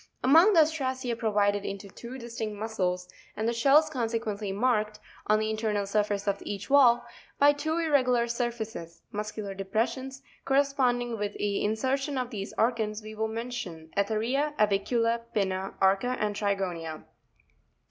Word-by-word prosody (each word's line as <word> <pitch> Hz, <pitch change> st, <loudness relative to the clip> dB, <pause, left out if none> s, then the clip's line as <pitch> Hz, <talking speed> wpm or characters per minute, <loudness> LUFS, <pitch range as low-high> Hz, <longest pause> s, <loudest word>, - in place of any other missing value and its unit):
Among 325 Hz, +11 st, +7 dB
the 330 Hz, -, +7 dB
Ostracea 260 Hz, -6 st, -1 dB
provided 205 Hz, -3 st, +1 dB
with 200 Hz, -1 st, -6 dB
two 245 Hz, +2 st, -8 dB
distinct 230 Hz, -3 st, -5 dB
muscles, 185 Hz, -4 st, -2 dB, 0.3 s
and 220 Hz, +1 st, -1 dB
the 235 Hz, -, +1 dB
shells 280 Hz, +6 st, +5 dB
con 255 Hz, -7 st, -2 dB
sequently 215 Hz, -3 st, -3 dB
marked, 215 Hz, 0 st, 0 dB, 0.3 s
on 215 Hz, -, +4 dB
the 215 Hz, 0 st, -1 dB
internal 215 Hz, -2 st, -1 dB
surface 205 Hz, 0 st, 0 dB
of 200 Hz, 0 st, 0 dB
each 200 Hz, +2 st, -5 dB
valve, 255 Hz, -4 st, +6 dB, 0.4 s
by 290 Hz, +1 st, +6 dB
two 315 Hz, +3 st, -2 dB
irregular 255 Hz, -7 st, +2 dB
sure 240 Hz, +1 st, 0 dB
faces 215 Hz, -8 st, -8 dB
(muscular 210 Hz, -1 st, -4 dB
depressions) 230 Hz, +7 st, -2 dB, 0.2 s
corresponding 255 Hz, -4 st, +1 dB
with 205 Hz, 0 st, -2 dB
the 205 Hz, -1 st, -1 dB
in 210 Hz, -, +1 dB
sertion 270 Hz, +4 st, -1 dB
of 250 Hz, 0 st, -3 dB
these 200 Hz, -3 st, -5 dB
organs, 220 Hz, -2 st, 0 dB
we 215 Hz, 0 st, -8 dB
will 220 Hz, +1 st, -1 dB
mention 220 Hz, -9 st, -6 dB
Etheria, 230 Hz, +9 st, 0 dB
Avicula, 230 Hz, +3 st, +2 dB
Pinna, 190 Hz, -2 st, -1 dB
Arca, 195 Hz, +6 st, +2 dB
and 210 Hz, -1 st, -1 dB
Trigonia. 180 Hz, -6 st, -2 dB
220 Hz, 150 wpm, -28 LUFS, 205-255 Hz, 0.4 s, Among